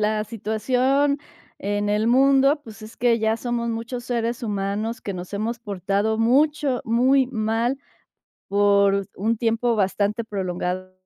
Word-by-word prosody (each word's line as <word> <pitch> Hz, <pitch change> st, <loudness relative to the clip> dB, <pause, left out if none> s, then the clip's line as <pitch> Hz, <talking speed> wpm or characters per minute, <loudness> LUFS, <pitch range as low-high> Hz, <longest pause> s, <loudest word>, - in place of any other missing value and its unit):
la 215 Hz, 0 st, 0 dB
situación 255 Hz, +6 st, 0 dB, 0.4 s
en 205 Hz, +1 st, -2 dB
el 210 Hz, +2 st, +1 dB
mundo, 275 Hz, +3 st, +4 dB
pues, 220 Hz, -1 st, -12 dB
es 215 Hz, -, -11 dB
que 235 Hz, -1 st, +2 dB
ya 220 Hz, 0 st, +1 dB
somos 235 Hz, 0 st, -2 dB
muchos 230 Hz, +2 st, -4 dB
seres 235 Hz, 0 st, -2 dB
humanos 210 Hz, +2 st, -2 dB
que 200 Hz, -, -5 dB
nos 180 Hz, +2 st, -8 dB
hemos 225 Hz, +4 st, -2 dB
portado 200 Hz, +1 st, -1 dB
mucho 280 Hz, +2 st, +2 dB
muy 255 Hz, +4 st, +3 dB
mal, 230 Hz, +2 st, -1 dB, 0.7 s
por 200 Hz, -1 st, +3 dB
un 225 Hz, +4 st, 0 dB
tiempo 230 Hz, +1 st, +1 dB
bastante 205 Hz, +2 st, 0 dB
prolongado. 185 Hz, -2 st, -3 dB
225 Hz, 135 wpm, -23 LUFS, 205-245 Hz, 0.7 s, mundo